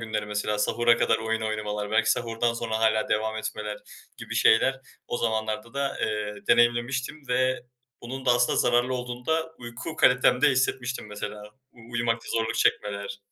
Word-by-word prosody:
günleri 110 -2 -3
mesela 105 0 -2
sahura 120 +2 +3
kadar - - +2
oyun 110 0 -1
oynamalar, 105 -1 -3
belki 110 0 +3
sahurdan 115 0 0
sonra 110 -2 -2
hâlâ 110 -1 +2
devam 110 +1 0
etmeler 105 -1 -4 0.4
gibi - - -7
şeyler 130 +4 +4 0.3
o - - -1
zamanlarda 110 0 -2
da, 140 0 -2
eee, 105 -1 -2
deneyimlemiştim 125 +4 +2
ve 130 +1 +1 0.4
bunun 130 +2 -6
da - - +5
aslında 120 0 +2
zararlı 120 +1 +2
olduğunu 125 0 -6
da 160 0 0
uyku 120 +6 -7
kalitemde 125 +3 +4
hissetmiştim 125 -2 -1
mesela. 105 0 -6 0.3
U 120 - -23
uyumakta 115 -1 -1
zorluk 115 -1 0
çekmeler. 100 -1 0
115 Hz, 155 wpm, -26 LUFS, 110-125 Hz, 0.4 s, da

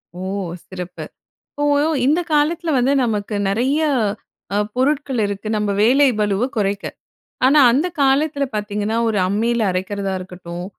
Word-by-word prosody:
ஓ! - - -8 0.5
சிறப்பு. 180 -1 -7 0.5
இப்போ 290 - -4 0.4
இந்த 305 +5 +3
காலத்துல 320 +2 +1
வந்து 255 +3 +2
நமக்கு 210 -2 -2
நிறைய, 260 +9 +1 0.7
அ - - +1 0.2
பொருட்கள் 270 -1 0
இருக்கு 200 +1 -5
நம்ம 210 -1 -1
வேலை 270 +5 +5
பளுவை 210 +4 +1
குறைக்க. 200 0 -1 0.6
ஆனா 290 +3 +5
அந்த 295 +9 +1
காலத்துல 280 +1 +2
பார்த்தீங்கன்னா, 210 +1 -2
ஒரு 215 -2 0
அம்மியில 225 +3 0
அரைக்கிறதா 195 +1 -3
இருக்கட்டும், 180 -1 -8
220 Hz, 130 wpm, -20 LUFS, 200-275 Hz, 0.7 s, வேலை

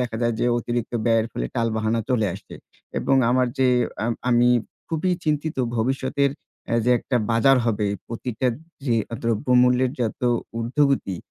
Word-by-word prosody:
দেখা 120 -2 -2
যায় 120 -1 +1
যে - - +2
অতিরিক্ত 120 0 -3
ব্যয়ের 115 -1 +3
ফলে - - -3
টাল-বাহানা 115 -1 0
চলে 110 -4 +2
আসছে। - - -11 0.4
এবং 135 - +2
আমার 125 0 +3
যে 130 - +4 0.4
আম 120 - +1 0.2
আমি 120 0 +4 0.4
খুবই 165 +3 0
চিন্তিত 155 0 -1 0.2
ভবিষ্যতের 135 +4 0 0.4
অ্যা 115 - 0
যে 125 - +3
একটা 125 - -2
বাজার 115 +4 +5
হবে, 105 -2 0 0.2
প্রতিটা 120 +2 -3 0.4
যে 120 - +2 0.3
দ্রব্যমূল্যের 125 +2 +3
যত 115 0 -2 0.4
উর্ধ্বগতি, 130 - +1
120 Hz, 145 wpm, -23 LUFS, 115-130 Hz, 0.4 s, বাজার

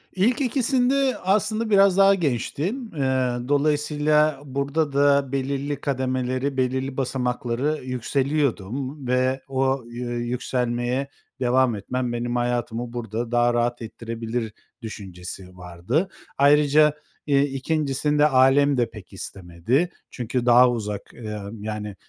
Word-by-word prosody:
İlk 235 +9 +2
2’sinde 260 +1 +2
aslında 215 +4 0
biraz 195 -2 +5
daha 195 0 +6
gençtim. 175 - -2
Iıı, 130 -3 0
dolayısıyla 150 0 +2
burada 140 +2 -1
da 140 -1 +3
belirli 140 +1 -2
kademeleri, 130 0 -1
belirli 130 +1 -1
basamakları 125 +2 -1
yükseliyordum 130 0 -2
ve 130 +1 +1
o 135 -1 0
yü 120 +1 -5 0.2
yükselmeye 125 +1 -1 0.3
devam 125 -2 +2
etmem 120 +4 -3
benim 120 +1 -2
hayatımı 120 -1 -2
burada 115 0 -4
daha 120 0 +3
rahat 120 0 0
ettirebilir 115 0 -5 0.3
düşüncesi 90 -3 -8
vardı. 90 - -2 0.3
Ayrıca, 150 +1 +5 0.3
iii, 140 -1 +4
2’ncisinde 150 +1 +1
ailem 135 +1 +4
de 120 -1 +1
pek 105 -3 -13
istemedi. 95 - -2 0.2
Çünkü 125 0 -3
daha 125 +1 +7
uzak, 105 -3 -5
ııı, 105 -3 -6
yani, 105 -1 -5
130 Hz, 110 wpm, -24 LUFS, 120-145 Hz, 0.3 s, daha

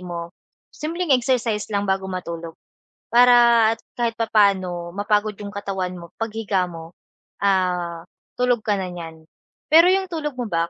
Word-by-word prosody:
mo, 170 -1 -7 0.4
simpleng 330 0 -2
exercise 240 -5 +1
lang 205 -1 -1
bago 190 -1 -1
matulog 170 -3 -6 0.6
para 235 -2 +6
at - - -27 0.2
kahit 230 -1 0
papaano 190 -6 +1
mapagod 210 +1 0
yung 200 - -6
katawan 190 -3 -4
mo 170 0 -13
paghiga 210 -4 -1
mo, 165 0 -10 0.5
ah, 180 -3 0 0.3
tulog 245 -2 +2
ka 210 -1 0
na 185 - -3
niyan. 165 -2 -9 0.4
Pero 330 +3 +7
yung 385 0 +1
tulog 310 -5 -4
mo 245 - -2
ba 170 -2 -1
200 Hz, 145 wpm, -22 LUFS, 175-235 Hz, 0.6 s, Pero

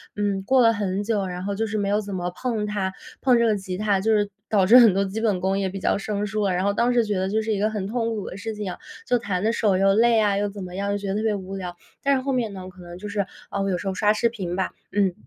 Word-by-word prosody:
嗯， 200 -2 -1
过 260 +5 +4
了 230 -1 +5
很 200 -1 -2
久， 205 -3 0
然 180 0 -5
后 200 0 -2
就 220 +2 -1
是 215 +1 -2
没 200 -1 0
有 210 +1 +2
怎 200 -2 -6
么 180 0 -2
碰 220 +1 -2
它， 200 -2 -2 0.3
碰 250 -3 +4
这 235 - +3
个 215 -2 +3
吉 190 -2 -5
他， 205 -2 +1
就 220 +3 +1
是 205 -1 +2 0.2
导 195 -3 +3
致 235 +6 +8
很 230 -6 +8
多 195 +1 +2
基 195 +3 -4
本 205 -5 +1
功 190 +1 +1
也 195 - 0
比 195 +1 -6
较 - - +1
生 205 +1 -2
疏 210 0 -1
了， 185 - +1
然 180 +1 0
后 200 0 +2
当 240 +3 +2
时 240 -1 +4
觉 210 -1 -1
得 190 +1 0
这 220 +2 +1
是 220 0 -1
一 200 - -1
个 215 - +2
很 210 -3 -3
痛 230 0 -1
苦 205 - -5
的 185 - -8
事 220 +2 -4
情 205 -3 -4
啊， - - -8 0.3
就 245 - +3
弹 200 -4 -2
得 225 - +3
手 205 -5 +2
又 195 0 +4
累 230 +1 +4
啊， 205 -2 +2
又 205 - 0
怎 200 -1 -7
么 180 0 -8
样， 200 +1 -1
就 205 - 0
觉 200 -1 -6
得 195 - -1
特 215 - 0
别 215 -2 +1
无 195 0 -6
聊。 180 -2 -5 0.3
但 280 0 +3
是 260 - 0
后 275 +1 -2
面 235 -5 -1
呢， 185 -1 -7
我 - - -8
可 180 0 -15
能 175 0 -9
就 210 +3 -7
是 200 -1 -1 0.3
呃， 200 - -1
我 195 - 0
有 180 - 0
时 195 - -6
候 190 - 0
刷 210 +2 +3
视 235 +2 +1
频 185 -6 -4
吧， 190 - -1 0.2
嗯， 195 -3 +2
205 Hz, 355 characters per minute, -24 LUFS, 190-220 Hz, 0.3 s, 致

